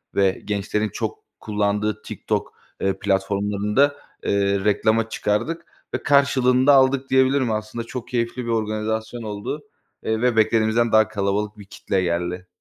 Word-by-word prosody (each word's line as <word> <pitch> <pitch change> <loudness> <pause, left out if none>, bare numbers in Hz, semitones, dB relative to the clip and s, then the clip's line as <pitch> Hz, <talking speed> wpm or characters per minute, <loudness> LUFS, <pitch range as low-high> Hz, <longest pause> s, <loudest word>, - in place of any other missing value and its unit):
ve 95 -1 +2
gençlerin 105 +1 -1
çok - - -4 0.2
kullandığı 105 0 -1
TikTok, - - -3 0.3
eee, 95 0 0
platformlarında, 105 +7 +1 0.3
eee, 100 0 +1
reklama 110 +2 +2
çıkardık 165 +14 -1 0.3
ve - - -2
karşılığını 130 -2 +3
da 145 - +8
aldık 135 0 +4
diyebilirim. 130 -2 +3
Aslında 110 +2 -3
çok 120 +1 -6
keyifli 120 0 -2
bir - - -4
organizasyon 110 +1 -2
oldu, 105 +8 -5 0.4
eee, 110 0 -1
ve 125 -2 +2
beklediğimizden 110 +1 +3
daha 110 -1 +5
kalabalık 105 0 -2
bir 100 - -11
kitle 95 -1 -2
geldi. 90 +1 -2
110 Hz, 140 wpm, -22 LUFS, 100-125 Hz, 0.4 s, da